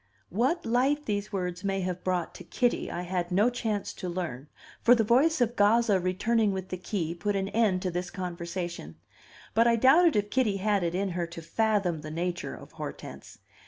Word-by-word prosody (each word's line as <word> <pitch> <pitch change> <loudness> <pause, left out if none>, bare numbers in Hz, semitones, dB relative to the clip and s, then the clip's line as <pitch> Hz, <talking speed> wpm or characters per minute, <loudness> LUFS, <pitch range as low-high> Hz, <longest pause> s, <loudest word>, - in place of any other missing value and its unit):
What 260 - 0
light 265 +6 +1
these 205 0 -2
words 180 -2 -3
may 195 -1 -1
have 180 -1 -3
brought 180 -3 -1
to - - -10
Kitty, 245 -2 0
I 175 - -4
had 180 0 -2
no 205 +7 +3
chance 220 -4 -2
to 180 - -5
learn; 160 -7 -4 0.3
for 245 +1 +6
the 225 - +2
voice 265 +7 +3
of 240 0 +1
Gazza 210 -1 +4
returning 205 +4 +1
with 190 0 -5
the 185 - -4
key 175 -3 -3
put 205 +4 -2
an 195 0 -1
end 205 -5 +1
to 185 - -1
this 180 +1 -3
conversation. 175 - -5 0.6
But 230 +2 +4
I 235 - +4
doubted 290 +8 +5
if 205 0 0
Kitty 230 -7 +1
had 205 0 +1
it 170 0 -1
in 195 +1 0
her 175 -1 -2
to 170 0 -9
fathom 195 -2 0
the 155 - -7
nature 175 +3 -3
of - - -13
Hortense. - - -8
195 Hz, 195 wpm, -28 LUFS, 180-225 Hz, 0.6 s, for